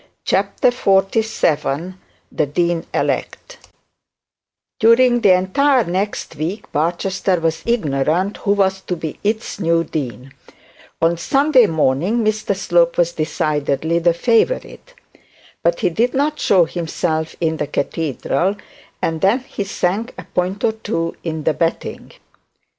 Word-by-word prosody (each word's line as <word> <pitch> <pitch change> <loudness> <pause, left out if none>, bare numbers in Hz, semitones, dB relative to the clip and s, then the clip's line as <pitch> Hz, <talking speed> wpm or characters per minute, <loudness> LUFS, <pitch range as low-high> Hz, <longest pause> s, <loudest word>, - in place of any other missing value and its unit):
CHAPTER 200 +5 +2
XLVII 195 - +1 0.4
THE 150 - 0
DEAN 170 +3 -1
ELECT - - -3 1.2
During 240 +2 +5
the 195 - +6
entire 250 +9 +2
next 190 -1 -3
week 180 +8 -4
Barchester 180 +4 0
was 165 -1 -1
ignorant 170 - 0
who 200 - +1
was 190 -1 +1
to 180 - -3
be 160 -2 -6
its 215 0 -2
new 165 -2 +2
dean 130 -4 -5 0.7
on 170 +1 +3
Sunday 275 - +4
morning. 165 - +1
Mr 215 -2 0
Slope 175 -3 +2
was 170 -1 +2
decidedly 155 0 -1
the 170 0 +2
favourite; 255 - 0 0.7
but 170 0 +1
he 180 - +2
did 235 +9 0
not 295 +2 0
show 180 -3 +4
himself 160 -1 -3
in 160 -2 0
the 150 - -2
cathedral, 160 +5 -1 0.5
and 160 -1 -1
then 205 +7 +3
he 230 -5 -5
sank 195 +4 -2
a - - -7
point 185 +3 -2
or 225 - +3
two 165 -6 -3
in 160 -2 -4
the 160 0 +2
betting. 165 +1 -3
180 Hz, 130 wpm, -19 LUFS, 160-215 Hz, 1.2 s, the